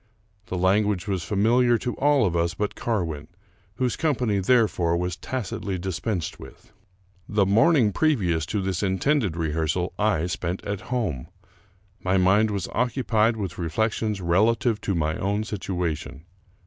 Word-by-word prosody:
The 90 - -3
language 100 +2 +1
was 95 -4 -1
familiar 115 +6 +3
to 120 +1 -3
all 145 -4 +3
of 90 -3 0
us 85 +1 0
but 105 -1 -2
Carwin, 80 -10 -2 0.5
whose 125 -1 0
company, 125 - 0
therefore, 95 -6 +2
was 90 0 -2
tacitly 100 -5 -4
dispensed 90 -1 -3
with. 65 - -14 0.6
The 105 -2 +2
morning 115 - +4
previous 90 - +1
to 100 +2 -2
this 95 -2 -2
intended 100 - +1
rehearsal 80 +2 -1
I 100 -6 +2
spent 90 +1 -3
at 100 -2 -3
home. 105 - -2 0.8
My 95 +1 +2
mind 95 +4 +4
was 100 -4 -2
occupied 115 -2 +1
with 95 -5 -5
reflections 105 +4 -1
relative 110 +5 +2
tO' 100 - -1
my 80 -1 0
own 100 +2 -1
situation. 85 -8 -4
100 Hz, 140 wpm, -25 LUFS, 85-110 Hz, 0.8 s, morning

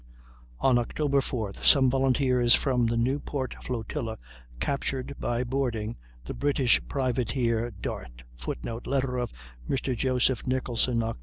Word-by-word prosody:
On 130 -2 +4
October 140 +3 +1
4th 110 -7 -3
some 135 -3 +7
volunteers 130 -2 +4
from 125 -4 +1
the 115 0 0
Newport 130 +2 -1
flotilla 115 -1 -4 0.4
captured, 135 - -2
by 120 +1 0
boarding, 120 -4 -2 0.3
the - - -5
British 140 -3 +2
privateer 120 -3 0
Dart, 60 - -7
[Footnote: 60 - -5
Letter 130 -2 0
of 120 - -2 0.4
Mr. 130 -1 0
Joseph 130 0 +1
Nicholson, 125 -2 +1
Oct. 115 - -3
125 Hz, 125 wpm, -27 LUFS, 115-135 Hz, 0.4 s, some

